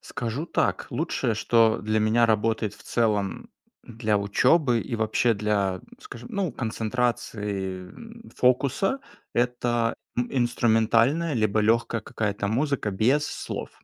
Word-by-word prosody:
Скажу 125 +7 -4
так: - - 0
лучшее, 115 - -1
что 115 0 +3
для 110 +1 0
меня 115 +2 +3
работает 110 -1 0
в - - -17
целом 105 -4 -1 0.3
для 110 -3 -1
учёбы 125 +5 +3
и 115 - -4
вообще 110 +2 +2
для, 100 -2 0 0.2
скажем, 425 -11 -10
ну 195 - -1
концентрации, 105 -5 -2
м, 230 - -13
фокуса- 140 - +2 0.4
это 120 -1 0 0.2
ин 125 0 0
инструментальная 120 +5 +2
либо 110 -1 +1
лёгкая 115 +1 +1
какая-то 100 -1 -3
музыка 135 -1 0
без 130 +10 +2
слов. - - -5
115 Hz, 120 wpm, -25 LUFS, 105-125 Hz, 0.4 s, что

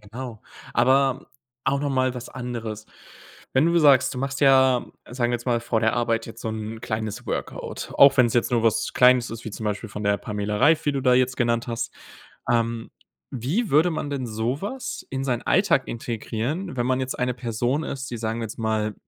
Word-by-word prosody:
Genau, 110 +2 -8 0.3
aber 130 +2 +3 0.4
auch 140 0 +1
nochmal 130 -3 0
was 125 0 -7
anderes. 115 -4 -6 0.7
Wenn 135 +4 +3
du 170 0 +2
sagst, 140 -6 +5
du 125 - -4
machst 135 +1 -3
ja, 130 -3 +5 0.2
sagen 120 -1 0
wir - - +2
jetzt 120 0 -4
mal 120 -2 +2
vor 115 -1 0
der 110 +1 +2
Arbeit 115 -1 0
jetzt 115 0 -10
so - - -4
'n 110 0 -5
kleines 110 -1 -4
Workout, - - -5
auch 140 0 +7
wenn 130 -2 +6
es 115 - -3
jetzt 120 - +2
nur 115 -2 +2
was 115 -2 +1
Kleines 125 -1 +5
ist, 115 0 -7
wie 110 - -5
zum 110 - -7
Beispiel 105 +2 -3
von 105 +1 -6
der 100 0 +3
Pamela 105 -1 -3
Reif, 160 +6 +4
wie 145 - +1
du 140 - -1
da 125 -1 +4
jetzt 125 0 +2
genannt 115 -2 +1
hast. 115 -1 -3 0.6
Ähm, 115 -1 0 0.4
wie 155 - -1
würde 155 +5 +4
man 155 -2 -3
denn 135 -3 -3
sowas 130 - -4
in 135 0 -3
seinen 125 -3 -1
Alltag - - +2
integrieren, 120 - -4
wenn 120 0 0
man 130 0 +1
jetzt 130 0 -3
eine 125 0 0
Person 120 +4 -1
ist, 135 -2 -5
die 120 - -4
sagen 115 +1 -3
wir - - -2
jetzt 110 - -7
mal 110 -1 -1
120 Hz, 210 wpm, -24 LUFS, 115-130 Hz, 0.7 s, auch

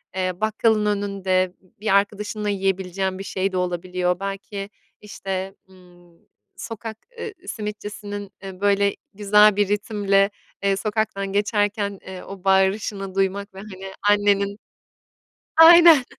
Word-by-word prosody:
eee, 185 -1 0
bakkalın 215 0 +2
önünde 195 -3 0
b 185 - -30
bir 210 -2 +1
arkadaşınla 210 +1 0
yiyebileceğin 190 -1 -1
bir - - -5
şey 195 0 -2
de 185 - -2
olabiliyor. 180 0 -1
Belki 195 0 -5 0.3
işte, 195 -2 -5
ımm, 175 -2 -20 0.4
sokak, 225 -1 -7 0.2
ııı, 455 - -4 0.2
simitçisinin, 205 -1 -6
eee, 190 -1 -8
böyle 200 0 +2 0.2
güzel 210 +1 +5
bir 205 -1 +2
ritimle, 200 -1 +1 0.3
eee, 200 0 +2
sokaktan 200 -2 -2
geçerken 205 -1 0
eee 190 -1 -8
o 195 -2 -10
bağırışını 195 0 +1
duymak 195 +1 -1
ve 190 - -10
hani 195 -2 -9 0.2
annenin, 200 -1 +2 1.0
aynen, 330 -3 +9
200 Hz, 120 wpm, -23 LUFS, 190-210 Hz, 1.0 s, aynen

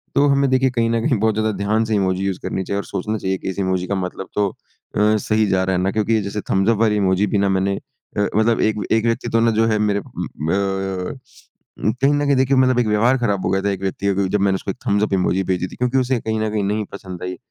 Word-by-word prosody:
तो 140 +1 +4
हमें 140 -1 +3
देखिए 130 0 +3
कहीं 115 -2 +1
न 115 0 +1
कहीं 125 - +2
बहुत 110 0 +2
ज़्यादा 110 0 +1
ध्यान 105 +3 +1
से 110 -1 0
इमोजी 95 -1 0
यूज़ 95 -2 -2
करनी 95 - -2
चाहिए 100 +2 -3
और 100 - -2
सोचना 105 +3 -3
चाहिए 95 -1 -2
कि - - -5
इस 95 - -5
इमोजी 95 -1 0
का 100 - -1
मतलब 95 0 -4
तो 105 -1 +2
अ, 105 +3 -2
सही 110 +1 +1
जा 95 -1 +2
रहा 95 0 0
है 90 - 0
ना, 95 +1 +1
क्योंकि 110 +1 +1
जैसे 100 +1 -4
थम्स 95 +3 +2
अप 115 - +3
वाली 110 -2 +3
इमोजी 95 0 +2
भी 100 - 0
ना 100 0 +2
मैंने 95 +1 +1 0.4
अ, - - +2
मतलब 110 +1 +2
एक 105 -2 +1
एक 110 +1 +2
व्यक्ति 115 0 0
तो 115 - +2
ना 115 0 +3
जो 110 +1 +2
है 110 -1 +1
मेरे 105 -1 +1
उम - - -6
अ, 95 - -2 0.8
कहीं 140 +2 +4
न 145 0 +1
कहीं 140 -1 +3
देखिए 130 0 +3
मतलब 130 -1 +4
एक 115 - +1
व्यवहार 115 +5 +3
खराब 100 -6 -1
हो - - +1
गया 95 0 +1
था 100 - +1
एक 95 -1 -4
व्यक्ति 95 +1 -3
का 100 - +3
क्योंकि 95 -1 0
जब - - -3
मैंने 95 -1 +2
उसको - - -3
एक - - -10
थम्स 100 0 +2
अप 105 - -1
इमोजी 95 0 +1
भेजी 90 0 -1
थी - - -12
क्योंकि 125 +1 0
उसे 125 -1 0
कहीं 110 0 -2
न 110 - 0
कहीं 105 -1 -1
नहीं 105 +1 -1
पसंद 95 -3 -8
आई। 90 0 -4
105 Hz, 280 wpm, -20 LUFS, 95-115 Hz, 0.8 s, तो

